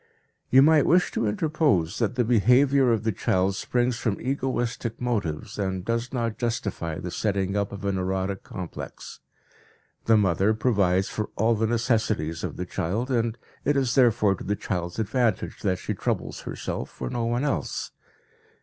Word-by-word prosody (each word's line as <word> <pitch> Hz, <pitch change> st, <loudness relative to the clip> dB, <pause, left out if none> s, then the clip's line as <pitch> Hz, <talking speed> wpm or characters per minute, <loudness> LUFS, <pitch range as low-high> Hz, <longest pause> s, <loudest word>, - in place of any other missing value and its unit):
You 135 Hz, +1 st, +7 dB
might 155 Hz, -1 st, +5 dB
wish 180 Hz, +2 st, +4 dB
to 115 Hz, -, 0 dB
interpose 110 Hz, -, +1 dB
that 115 Hz, +1 st, 0 dB
the 125 Hz, -, +2 dB
behavior 125 Hz, +4 st, +4 dB
of 110 Hz, -2 st, +1 dB
the 110 Hz, -, +1 dB
child 95 Hz, 0 st, +1 dB
springs 120 Hz, +2 st, 0 dB
from 110 Hz, -7 st, -1 dB
egoistic 125 Hz, -3 st, -2 dB
motives 105 Hz, -10 st, -2 dB
and 95 Hz, -2 st, -2 dB
does 115 Hz, +2 st, -1 dB
not 115 Hz, -4 st, -2 dB
justify 100 Hz, -9 st, -2 dB
the 90 Hz, -, -5 dB
setting 100 Hz, -1 st, -1 dB
up 100 Hz, 0 st, 0 dB
of 100 Hz, 0 st, -7 dB
an 100 Hz, -1 st, 0 dB
erotic 95 Hz, +1 st, -2 dB
complex. 90 Hz, -3 st, -8 dB, 0.9 s
The 110 Hz, -1 st, +5 dB
mother 100 Hz, +2 st, +2 dB
provides 100 Hz, -5 st, +2 dB
for 110 Hz, -, -3 dB
all 115 Hz, +3 st, +3 dB
the 110 Hz, 0 st, +1 dB
necessities 110 Hz, -, 0 dB
of -, -, -4 dB
the 90 Hz, -, -3 dB
child, 105 Hz, +10 st, -2 dB
and 115 Hz, -2 st, 0 dB, 0.3 s
it 145 Hz, -, +2 dB
is 130 Hz, -3 st, +1 dB
therefore 115 Hz, -6 st, +4 dB
to -, -, -8 dB
the 105 Hz, -, -1 dB
child's 90 Hz, -4 st, -4 dB
advantage 110 Hz, -1 st, 0 dB
that 95 Hz, -3 st, +1 dB
she -, -, -3 dB
troubles -, -, -2 dB
herself -, -, -4 dB
for 65 Hz, -, -6 dB
no 120 Hz, -1 st, -1 dB
one 120 Hz, +3 st, 0 dB
else. 145 Hz, -, -2 dB
110 Hz, 170 wpm, -26 LUFS, 95-125 Hz, 0.9 s, You